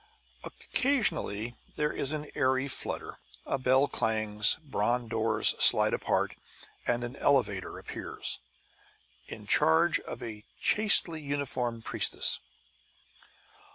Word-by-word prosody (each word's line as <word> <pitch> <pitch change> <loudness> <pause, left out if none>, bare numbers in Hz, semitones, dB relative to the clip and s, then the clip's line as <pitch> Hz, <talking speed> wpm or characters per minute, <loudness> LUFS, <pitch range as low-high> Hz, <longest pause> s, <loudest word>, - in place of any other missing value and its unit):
Occasionally 170 - -1 0.2
there 150 0 -1
is 140 - -4
an 150 -1 -5
airy 130 -1 0
flutter, 130 - -3 0.3
a 135 - -2
bell 130 +2 +3
clangs, 110 -2 +2
bronze 120 -3 -2
doors 115 0 +3
slide - - +6
apart, - - -1 0.5
and 120 0 0
an 120 +2 -6
elevator 105 -9 0
appears, - - -6 0.9
in - - -10
charge 80 0 +3
of - - -9
a 105 -2 -8 0.2
chastely 190 -6 +3
uniformed 130 -5 -4
priestess. - - +1
125 Hz, 105 wpm, -29 LUFS, 110-145 Hz, 0.9 s, slide